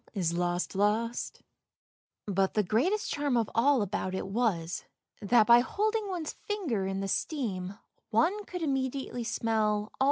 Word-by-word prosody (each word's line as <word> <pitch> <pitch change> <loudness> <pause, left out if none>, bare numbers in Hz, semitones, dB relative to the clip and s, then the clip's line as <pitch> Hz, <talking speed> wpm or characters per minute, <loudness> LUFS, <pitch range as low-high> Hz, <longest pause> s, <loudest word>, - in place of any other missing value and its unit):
1 175 -2 0 1.7
But 195 -1 0
the 210 - +3
greatest 345 - +1
charm 285 -4 0
of 225 -3 0
all 255 0 +4
about 190 -1 -3
it 190 - -3
was, 190 -5 -1 0.4
that 220 +2 +4
by 235 +1 +8
holding 425 - 0
one's 345 -5 -3
finger 295 - -2
in 195 0 -2
the 195 - -2
steam 200 - -2 0.3
one 355 - +2
could 360 -2 -5
immediately 265 -3 -2
smell 225 -1 0
all 215 - +3
the - - -2
1 210 - -10
Alas - - -27
230 Hz, 155 wpm, -29 LUFS, 195-290 Hz, 1.7 s, by